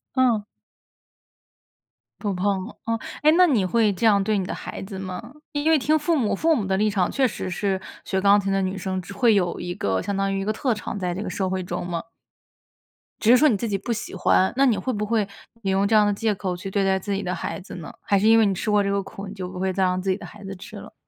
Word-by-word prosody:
嗯。 240 -5 +3 1.8
不 205 -2 -1
碰， 190 +1 -1 0.2
嗯。 230 0 0 0.3
诶， 305 - +7
那 365 - +7
你 255 - +2
会 215 +1 +2
这 190 - -2
样 200 -3 +5
对 215 +1 +1
你 190 - -1
的 - - -4
孩 - - -7
子 195 0 -7
吗？ 185 -1 -5 0.3
因 290 +2 0
为 320 - +6
听 300 +3 +2
父 310 +2 +1
母 225 -6 +1
父 320 +9 +3
母 215 - -1
的 190 0 0
立 215 +2 +2
场 190 -4 0
确 270 -2 +2
实 200 -4 -5
是 190 +1 -1 0.3
学 190 - 0
钢 200 +1 +5
琴 195 -1 -2
的 195 - +1
女 190 +1 -2
生 185 0 -3
只 200 - -10
会 225 +2 +4
有 175 -3 0
一 175 - -4
个 95 - 0
相 200 - -3
当 195 0 0
于 195 - -1
一 - - -3
个 215 - +1
特 245 +3 0
长， 215 -1 -5
在 180 -2 -2
这 185 - -4
个 - - -4
社 190 -2 -2
会 185 0 -2
中 175 0 -4
嘛。 170 -1 -3 1.2
只 225 - +4
是 250 - +8
说 300 +3 +5
你 220 - +2
自 230 - -3
己 200 -2 0
不 235 - -5
喜 225 0 -4
欢， 190 - +3
那 275 +2 +4
你 235 -6 +3
会 250 +7 -2
不 210 -1 -2
会 215 -2 +1 0.4
你 195 - 0
用 195 +1 +2
这 220 - +2
样 210 -1 +6
的 205 - +2
借 215 +1 0
口 185 -2 -3
去 185 +2 -6
对 195 0 +1
待 190 0 +2
自 200 +2 -5
己 195 - -2
的 180 - -2
孩 175 - -4
子 185 - -10
呢？ 170 -3 -8
还 200 - +2
是 210 - +2
因 225 0 +7
为 225 - +5
你 200 - +2
吃 195 +4 -3
过 210 -1 +4
这 200 - 0
个 200 0 +1
苦， 195 +1 -9
你 190 - -7
就 185 -3 -6
不 180 0 -7
会 190 0 0
再 190 0 +1
让 185 0 +1
自 190 - -2
己 190 - +1
的 - - -10
孩 210 - -12
子 195 0 -6
吃 180 - -11
了？ - - -11
200 Hz, 305 characters per minute, -24 LUFS, 190-220 Hz, 1.8 s, 是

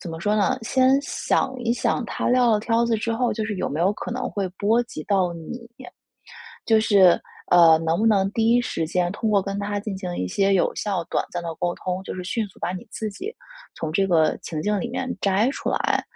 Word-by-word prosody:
怎 170 - -7
么 165 - -6
说 210 +3 +1
呢， 255 +5 +1
先 260 +3 +3
想 270 -1 -1
一 235 -1 0
想 240 0 0
他 - - -2
撂 245 -1 +4
了 215 - +3
挑 230 +1 +1
子 235 -1 +1
之 230 +2 -2
后， 245 +1 0
就 220 - -3
是 210 - -3
有 - - -2
没 150 +3 -3
有 185 - +3
可 215 - -7
能 250 +1 -3
会 200 -2 -2
波 225 +4 +3
及 230 -9 -8
到 190 -3 +1
你。 230 +9 -8 1.0
就 220 -1 +4
是， 195 -5 +5 0.3
呃， 170 -2 +7
能 165 +2 +1
不 225 - +2
能 195 -3 +3
第 225 0 +2
一 240 - +5
时 165 -9 -2
间， 175 +1 0
通 220 +1 -2
过 200 -2 +3
跟 195 +1 -4
他 205 0 -2
进 205 -2 -5
行 180 -2 -5
一 90 - -2
些 195 - +2
有 180 - +1
效、 190 -5 -2
短 - - +1
暂 175 -1 -4
的 165 -1 -5
沟 175 -1 -1
通， 185 0 -4
就 - - -6
是 180 -1 -6
迅 215 +3 -2
速 - - -20
把 180 - -2
你 185 - -7
自 215 -1 -4
己， 380 - -6 0.5
从 155 -1 -4
这 195 +3 +2
个 160 -4 +3
情 155 -2 -4
境 210 0 0
里 240 - -3
面 255 +1 -3
摘 200 +5 +2
出 - - -5
来。 - - 0
205 Hz, 260 characters per minute, -23 LUFS, 180-230 Hz, 1.0 s, 呃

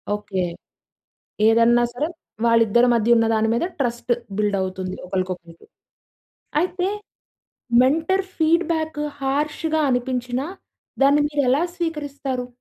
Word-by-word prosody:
Okay. 195 -3 -3 1.1
ఏదన్నా 230 +1 +5
సరే 295 +6 -2 0.4
వాళ్ళిద్దరి 230 +1 +4
మధ్యున్న 230 0 +4
దాని 220 0 +2
మీద 235 - 0
ట్రస్ట్ 240 -2 -1 0.2
బిల్డ్ 205 -1 +1
అవుతుంది. 185 0 -4
ఒకలకొకలకి. 180 -3 -5 0.9
అయితే 365 +1 -1 0.9
మెంటర్ 325 +8 +2
ఫీడ్బ్యాక్ 320 -1 +1 0.2
హర్ష్‌గా 300 +3 -1
అనిపించిన 250 0 -1 0.6
దాన్ని 285 +2 +5
మీరెలా 285 0 +2
స్వీకరిస్తారు? 285 -6 -3
250 Hz, 90 wpm, -22 LUFS, 225-305 Hz, 1.1 s, ఏదన్నా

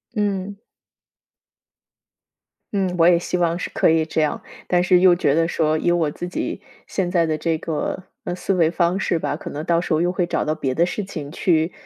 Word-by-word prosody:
嗯。 200 -1 -2 2.2
嗯， 190 -3 0
我 165 - +5
也 175 -1 +6
希 175 +1 -2
望 170 -1 +1
是 - - -4
可 - - +2
以 160 -1 +3
这 160 - -2
样， 150 - -1 0.3
但 175 -1 +2
是 180 0 +4
又 180 -1 +6
觉 145 -5 +1
得 165 +2 +2
说， 155 -2 +1
以 165 - 0
我 165 -4 +1
自 175 - -6
己 185 +2 -4 0.2
现 185 -3 -2
在 175 -2 +2
的 155 -1 -1
这 165 +1 0
个， 165 +3 -3 0.2
呃， 175 - -2
思 195 - -1
维 165 -3 +3
方 175 +2 +1
式 170 - 0
吧， - - -2
可 - - -8
能 150 - -5
到 170 +1 +2
时 175 - -2
候 155 - +2
又 175 +1 +1
会 180 -1 0
找 175 - -1
到 155 - 0
别 135 -5 -2
的 170 - +3
事 195 +2 -4
情 150 -6 -7
去， 165 0 +1
170 Hz, 235 characters per minute, -21 LUFS, 160-180 Hz, 2.2 s, 也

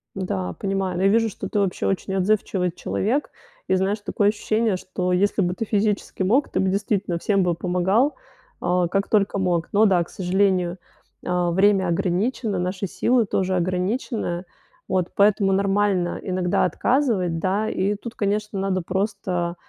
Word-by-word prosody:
Да, 95 - -3
понимаю. 195 -2 -2
Ну 190 - 0
я 195 - +5
вижу, 225 +1 +3
что 195 0 -6
ты 205 - 0
вообще 195 -2 -1
очень 195 0 -1
отзывчивый 190 -2 +1
человек. 235 - -1 0.4
И 190 - +3
знаешь, 195 +3 0
такое 205 0 +1
ощущение, 215 -1 0
что 180 0 -3
если 200 +2 +2
бы 180 0 +1
ты 225 - -4
физически 205 -2 -1
мог, 245 +10 +2
ты - - -1
бы 190 0 +2
действительно 200 -2 -1
всем 195 -1 +1
бы 175 -1 +1
помогал, 190 - +1 0.5
э, 175 0 +1
как 195 +1 -1
только 200 -2 +2
мог. 175 -3 0
Но 215 +2 +5
да, 180 -4 +3
к - - -16
сожалению, 185 -2 +1 0.5
э, 180 -1 0
время 190 +1 +3
ограничено, 195 +4 0
наши 185 +2 -2
силы 240 +4 +2
тоже 190 -1 0
ограничены, 185 +1 -2 0.4
вот. 185 -2 0
Поэтому 200 -1 +3
нормально 195 -2 +1
иногда 185 -2 0
отказывать 190 - +1
да. 200 +5 0
И 200 +2 0
тут, 230 +3 -8
конечно, 210 0 -1
надо 190 -1 0
просто 185 -2 -2
195 Hz, 160 wpm, -23 LUFS, 180-205 Hz, 0.5 s, я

